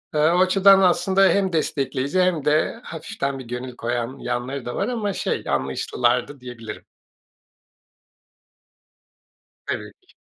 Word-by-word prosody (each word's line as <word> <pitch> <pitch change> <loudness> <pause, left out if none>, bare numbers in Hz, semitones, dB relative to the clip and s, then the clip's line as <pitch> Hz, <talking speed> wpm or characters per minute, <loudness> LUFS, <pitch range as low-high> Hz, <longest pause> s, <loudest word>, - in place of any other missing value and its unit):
Eee, - - +2
o 175 +1 +2
açıdan 195 +1 +6
aslında 190 +1 +4
hem 190 +1 +1
destekleyici 140 +1 0
hem 175 -5 +1
de 155 +9 +1
hafiften 140 -4 -4
bir 130 - -9
gönül 125 +1 -6
koyan 120 +2 -3
yanları 125 +2 -4
da 120 - -4
var 200 - -1
ama, 220 -5 -2
şey, - - -2
anlayışlılardı, 120 - 0
diyebilirim. 115 -4 -9 2.8
Tabii - - -4 0.2
ki. - - -24
140 Hz, 125 wpm, -23 LUFS, 125-185 Hz, 2.8 s, açıdan